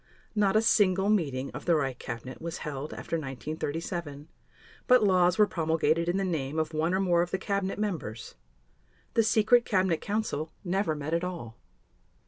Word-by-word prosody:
Not 205 Hz, -2 st, +2 dB
a 215 Hz, -, +4 dB
single 195 Hz, -2 st, +3 dB
meeting 140 Hz, -10 st, 0 dB
of -, -, -8 dB
the 170 Hz, -, +4 dB
Reich 135 Hz, -4 st, -1 dB
Cabinet 125 Hz, +1 st, -7 dB
was 165 Hz, 0 st, -4 dB
held 145 Hz, 0 st, -5 dB
after 165 Hz, -, -3 dB
1937, 150 Hz, -, -5 dB, 0.6 s
but 250 Hz, -3 st, +6 dB
laws 180 Hz, -2 st, +4 dB
were 210 Hz, -, +6 dB
promulgated 165 Hz, -1 st, +1 dB
in 180 Hz, -, +1 dB
the 195 Hz, -, 0 dB
name 155 Hz, -5 st, -2 dB
of 160 Hz, 0 st, -1 dB
one 160 Hz, +4 st, +1 dB
or -, -, +1 dB
more 175 Hz, -3 st, +3 dB
of 175 Hz, -, -1 dB
the 190 Hz, -, -1 dB
cabinet 200 Hz, 0 st, -2 dB
members. 170 Hz, -, -4 dB, 0.8 s
The 230 Hz, -, +4 dB
Secret 225 Hz, +2 st, +4 dB
Cabinet 185 Hz, -6 st, +1 dB
Council 200 Hz, -7 st, -2 dB
never 185 Hz, -3 st, 0 dB
met 150 Hz, +2 st, -4 dB
at 170 Hz, +1 st, +1 dB
all. 165 Hz, -11 st, -5 dB
170 Hz, 170 wpm, -28 LUFS, 150-195 Hz, 0.8 s, but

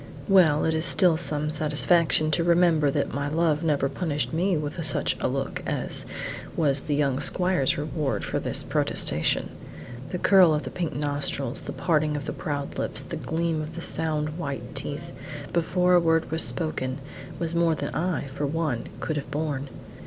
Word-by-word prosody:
Well, 170 Hz, -6 st, +5 dB
it 160 Hz, -, +1 dB
is 160 Hz, 0 st, 0 dB
still 180 Hz, -2 st, +4 dB
some 150 Hz, -1 st, -1 dB
satisfaction 155 Hz, +1 st, +3 dB
to 170 Hz, +3 st, +2 dB
remember 170 Hz, -3 st, +4 dB
that -, -, -1 dB
my 140 Hz, +1 st, -2 dB
love 155 Hz, 0 st, +1 dB
never 150 Hz, -4 st, +1 dB
punished 150 Hz, 0 st, -2 dB
me 180 Hz, +2 st, +1 dB
with 150 Hz, +3 st, -4 dB
such 150 Hz, -, +1 dB
a -, -, 0 dB
look -, -, -3 dB
as -, -, -2 dB, 0.5 s
was 140 Hz, -4 st, +3 dB
the 150 Hz, -, -1 dB
young 140 Hz, -2 st, +1 dB
squire's 180 Hz, -6 st, +1 dB
reward 150 Hz, -1 st, -2 dB
for -, -, -2 dB
this -, -, -2 dB
protestation. 75 Hz, +1 st, +1 dB, 0.6 s
The 180 Hz, -, -3 dB
curl 180 Hz, -4 st, +5 dB
of 150 Hz, -, -2 dB
the -, -, -6 dB
pink 170 Hz, -7 st, -3 dB
nostrils, 145 Hz, -2 st, -2 dB
the -, -, -6 dB
parting 155 Hz, -3 st, +1 dB
of 140 Hz, -, -5 dB
the 150 Hz, -, -3 dB
proud 145 Hz, -1 st, -4 dB
lips, -, -, -3 dB
the -, -, -6 dB
gleam 160 Hz, -1 st, -1 dB
of 155 Hz, +1 st, -7 dB
the 170 Hz, -, -5 dB
sound 155 Hz, -1 st, -2 dB
white 135 Hz, -6 st, -5 dB
teeth, 145 Hz, +4 st, -4 dB, 0.4 s
before 180 Hz, +2 st, +2 dB
a 175 Hz, -, +7 dB
word 165 Hz, -2 st, +1 dB
was 160 Hz, 0 st, +3 dB
spoken, 130 Hz, -6 st, 0 dB, 0.4 s
were 170 Hz, -1 st, -1 dB
more 170 Hz, -1 st, +2 dB
than -, -, -4 dB
I, 175 Hz, -2 st, -1 dB
for 140 Hz, +1 st, -3 dB
one, 145 Hz, -6 st, -2 dB
could 155 Hz, -, -2 dB
have 140 Hz, -, -5 dB
borne. 145 Hz, -2 st, -3 dB
155 Hz, 180 wpm, -26 LUFS, 145-170 Hz, 0.6 s, a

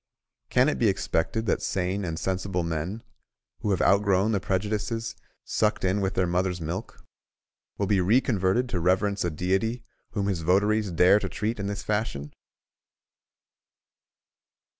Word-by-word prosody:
Can -, -, +4 dB
it -, -, 0 dB
be -, -, +3 dB
expected 110 Hz, +7 st, 0 dB
that 100 Hz, -, 0 dB
sane 95 Hz, +2 st, -1 dB
and 80 Hz, -3 st, -3 dB
sensible 95 Hz, 0 st, -2 dB
men, 85 Hz, +7 st, -3 dB, 0.6 s
who 105 Hz, -, -2 dB
have 95 Hz, -4 st, +1 dB
out 100 Hz, +2 st, +5 dB
grown 100 Hz, +1 st, +2 dB
the 105 Hz, -, +1 dB
prejudices 105 Hz, +4 st, -2 dB, 0.3 s
sucked -, -, 0 dB
in 95 Hz, +2 st, +1 dB
with 95 Hz, -1 st, -1 dB
their 90 Hz, -, +2 dB
mothers' 90 Hz, +1 st, 0 dB
milk, 85 Hz, +7 st, -6 dB, 0.7 s
will 100 Hz, -, 0 dB
be 100 Hz, -1 st, +2 dB
reconverted 105 Hz, +1 st, +2 dB
to 90 Hz, -, -1 dB
reverence 95 Hz, +4 st, +1 dB
a 90 Hz, -, 0 dB
Deity 95 Hz, +9 st, -1 dB, 0.3 s
whom 100 Hz, -3 st, -1 dB
his 95 Hz, -4 st, -1 dB
votaries 105 Hz, +5 st, +2 dB
dare 90 Hz, +4 st, +5 dB
to 95 Hz, -2 st, -4 dB
treat 110 Hz, +4 st, -3 dB
in 100 Hz, -, -2 dB
this 100 Hz, 0 st, -4 dB
fashion? 105 Hz, -10 st, -2 dB
95 Hz, 150 wpm, -26 LUFS, 90-105 Hz, 0.7 s, out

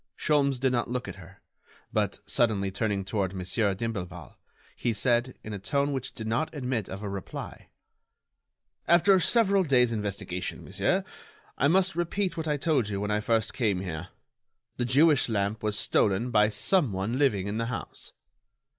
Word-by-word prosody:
Sholmes 140 Hz, -3 st, +2 dB
did 130 Hz, 0 st, +2 dB
not 120 Hz, -2 st, 0 dB
look 125 Hz, 0 st, -3 dB
at -, -, -7 dB
her, -, -, -15 dB, 0.5 s
but, -, -, 0 dB
suddenly 105 Hz, -5 st, +1 dB
turning 100 Hz, -1 st, -1 dB
toward 95 Hz, -2 st, -2 dB
Monsieur 95 Hz, +2 st, 0 dB
d'Imblevalle, 95 Hz, -6 st, -5 dB, 0.4 s
he 120 Hz, -, -1 dB
said, 120 Hz, +3 st, +1 dB
in 105 Hz, -, -6 dB
a 100 Hz, -, -4 dB
tone 140 Hz, +7 st, 0 dB
which 130 Hz, -1 st, -5 dB
did 110 Hz, -, -6 dB
not 120 Hz, +8 st, -1 dB
admit 125 Hz, -7 st, -2 dB
of 95 Hz, +2 st, -6 dB
a -, -, -3 dB
reply: 100 Hz, -1 st, -7 dB, 1.2 s
"After 180 Hz, +3 st, +5 dB
several 200 Hz, -1 st, +3 dB
days' 125 Hz, -6 st, +3 dB
investigation, 100 Hz, -4 st, -4 dB
monsieur, -, -, 0 dB, 0.5 s
I 140 Hz, -, +2 dB
must 190 Hz, +4 st, +3 dB
repeat 175 Hz, +1 st, -1 dB
what 160 Hz, -2 st, -4 dB
I 150 Hz, -1 st, +1 dB
told 140 Hz, -7 st, +1 dB
you 100 Hz, -1 st, -2 dB
when 105 Hz, +1 st, -2 dB
I 105 Hz, -, +2 dB
first 110 Hz, 0 st, 0 dB
came 105 Hz, -7 st, 0 dB
here: 90 Hz, -2 st, -5 dB, 0.7 s
the 120 Hz, -, 0 dB
Jewish 140 Hz, +2 st, +4 dB
lamp 105 Hz, 0 st, -1 dB
was 105 Hz, -1 st, -1 dB
stolen 105 Hz, +5 st, +1 dB
by 105 Hz, -1 st, +4 dB
some 135 Hz, -, +1 dB
one 100 Hz, +7 st, -2 dB
living 105 Hz, -10 st, +2 dB
in 100 Hz, +2 st, -3 dB
the 115 Hz, -, -1 dB
house." 125 Hz, -, -7 dB
115 Hz, 170 wpm, -28 LUFS, 100-140 Hz, 1.2 s, After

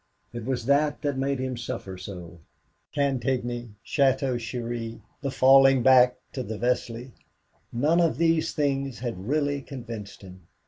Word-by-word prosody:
It 120 Hz, -2 st, -6 dB
was 125 Hz, -3 st, -2 dB
that 145 Hz, +3 st, +2 dB
that 145 Hz, -2 st, 0 dB
made 135 Hz, +1 st, 0 dB
him 130 Hz, 0 st, -3 dB
suffer 115 Hz, -5 st, -5 dB
so. 90 Hz, -2 st, -9 dB, 0.5 s
Cantigny, 120 Hz, -4 st, -1 dB
Château 135 Hz, -3 st, +1 dB
Thierry, 115 Hz, 0 st, -5 dB, 0.2 s
the 140 Hz, -, -2 dB
falling 135 Hz, -1 st, +6 dB
back 125 Hz, -1 st, +6 dB, 0.2 s
to 130 Hz, -, -3 dB
the 110 Hz, -2 st, -5 dB
Vesle 120 Hz, +1 st, -2 dB, 0.6 s
none 150 Hz, +8 st, +2 dB
of 165 Hz, -2 st, +2 dB
these 165 Hz, -1 st, +2 dB
things 135 Hz, -3 st, -1 dB
had 110 Hz, -5 st, -5 dB
really 145 Hz, 0 st, 0 dB
convinced 115 Hz, -8 st, -8 dB
him. 90 Hz, -2 st, -13 dB
125 Hz, 140 wpm, -26 LUFS, 115-140 Hz, 0.6 s, falling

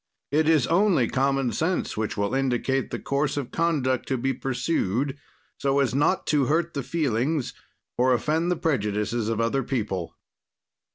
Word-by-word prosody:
It 155 Hz, +2 st, +3 dB
is 155 Hz, -6 st, +4 dB
only 170 Hz, -, +3 dB
common 135 Hz, -1 st, +1 dB
sense 160 Hz, -, -1 dB
which 110 Hz, 0 st, -3 dB
will 100 Hz, +3 st, -1 dB
indicate 135 Hz, 0 st, 0 dB
the -, -, -3 dB
course 140 Hz, +1 st, -1 dB
of 135 Hz, -4 st, -3 dB
conduct 145 Hz, -6 st, 0 dB
to 135 Hz, -, 0 dB
be 135 Hz, +2 st, 0 dB
pursued, 130 Hz, -, -1 dB, 0.4 s
so 140 Hz, 0 st, +1 dB
as 130 Hz, -4 st, +1 dB
not 165 Hz, +7 st, +2 dB
to 145 Hz, -3 st, +3 dB
hurt 165 Hz, +4 st, 0 dB
the 140 Hz, -, -2 dB
feelings 145 Hz, -2 st, -1 dB, 0.5 s
or 130 Hz, +1 st, +4 dB
offend 155 Hz, +7 st, +1 dB
the 180 Hz, -, +2 dB
prejudices 110 Hz, -6 st, -1 dB
of 115 Hz, -1 st, -1 dB
other 115 Hz, +4 st, +1 dB
people. 105 Hz, -9 st, -3 dB
135 Hz, 160 wpm, -25 LUFS, 120-155 Hz, 0.5 s, is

